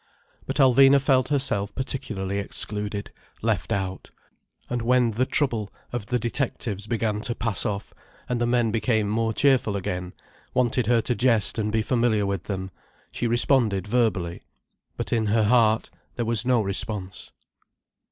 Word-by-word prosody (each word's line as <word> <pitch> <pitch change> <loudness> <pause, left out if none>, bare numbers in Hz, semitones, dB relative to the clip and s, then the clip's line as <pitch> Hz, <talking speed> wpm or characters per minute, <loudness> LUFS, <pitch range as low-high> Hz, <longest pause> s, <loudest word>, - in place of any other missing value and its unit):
But - - -2
Alvina 135 0 +6
felt 130 -1 +2
herself 115 -8 0
particularly 100 -7 -3
excluded, 105 0 -4 0.3
left - - 0
out. 95 -1 -3 0.6
And 120 -1 -2
when 120 0 +3
the 125 +4 0
trouble 115 -8 0 0.2
of 115 -4 -4
the 125 - +1
detectives 115 -4 -3
began 110 -2 -1
to 120 +1 -2
pass 115 +1 0
off, 100 -1 -4 0.3
and 125 -1 -2
the 120 - +2
men 120 -2 +2
became 110 -1 +1
more 110 +2 0
cheerful 130 -4 +2
again, 90 -2 -4 0.4
wanted 125 -2 +1
her 120 -1 +4
to 125 - -1
jest 115 -3 +2
and 105 0 -1
be 110 0 +1
familiar 115 -4 +1
with 100 -3 -3
them, 95 -2 -4 0.4
she 120 - -2
responded 120 -4 +2
verbally, 105 -7 0 0.6
but - - -3
in 110 -2 +1
her 110 +1 +2
heart 110 0 +3 0.2
there 120 - -2
was 115 +1 0
no 125 -3 +4
response. 100 -1 -3
115 Hz, 150 wpm, -25 LUFS, 105-125 Hz, 0.6 s, Alvina